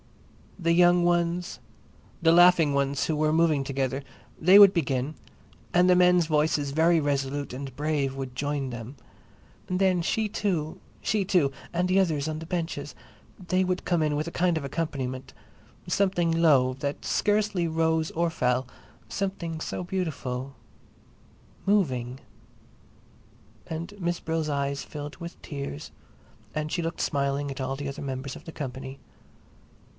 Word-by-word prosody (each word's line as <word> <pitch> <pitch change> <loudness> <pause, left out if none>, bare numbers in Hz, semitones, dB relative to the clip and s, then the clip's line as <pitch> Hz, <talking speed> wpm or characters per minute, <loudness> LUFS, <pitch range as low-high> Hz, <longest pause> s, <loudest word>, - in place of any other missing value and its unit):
The 170 -3 +1
young 175 0 +5
ones, 175 +1 0 0.6
the 165 -1 +5
laughing 175 -3 +6
ones 140 0 0
who 160 - 0
were 155 0 +2
moving 160 -4 +3
together, 135 0 -2 0.4
they 185 +4 +7
would 200 -1 +9
begin, 145 -3 -1 0.6
and 180 +1 +5
the 180 - +6
men's 180 -1 +5
voices, 150 -2 +1
very 165 +3 +4
resolute 140 -1 -1
and 135 0 -7
brave, 145 -3 -1
would 135 -2 -6
join 140 -1 -2
them. 120 +3 -7 0.7
And 180 0 -1
then 185 -2 +3
she 220 +5 0
too, 180 -7 -2 0.2
she 210 -1 +1
too, 175 -7 +2 0.2
and 175 +1 +1
the 185 +1 +3
others 160 -6 +1
on 155 -1 -3
the 165 - -7
benches—they 170 +3 -4
would 185 0 -2
come 175 -3 +1
in 150 -1 +1
with 150 +2 -2
a - - -4
kind 175 0 +1
of 155 - -3
accompaniment—something 165 +5 -3
low, 150 -6 +4
that 140 +2 -4
scarcely 205 -4 +1
rose 160 0 +1
or 170 +1 0
fell, 125 -4 0 0.4
something 180 -5 -3
so 180 - -4
beautiful—moving.... 135 - -4 1.5
And 165 +5 -5
Miss 175 -1 -1
Brill's 160 -1 -2
eyes 140 -1 -1
filled 145 -1 -7
with 170 0 -9
tears 140 - -6 0.7
and 155 0 -2
she 175 - -1
looked 165 +1 -3
smiling 140 0 0
at 135 - -7
all 130 +1 -2
the 140 +1 -5
other 140 +1 -6
members 135 0 -4
of - - -12
the 165 - -7
company. 130 -2 -6
155 Hz, 145 wpm, -27 LUFS, 140-175 Hz, 1.5 s, would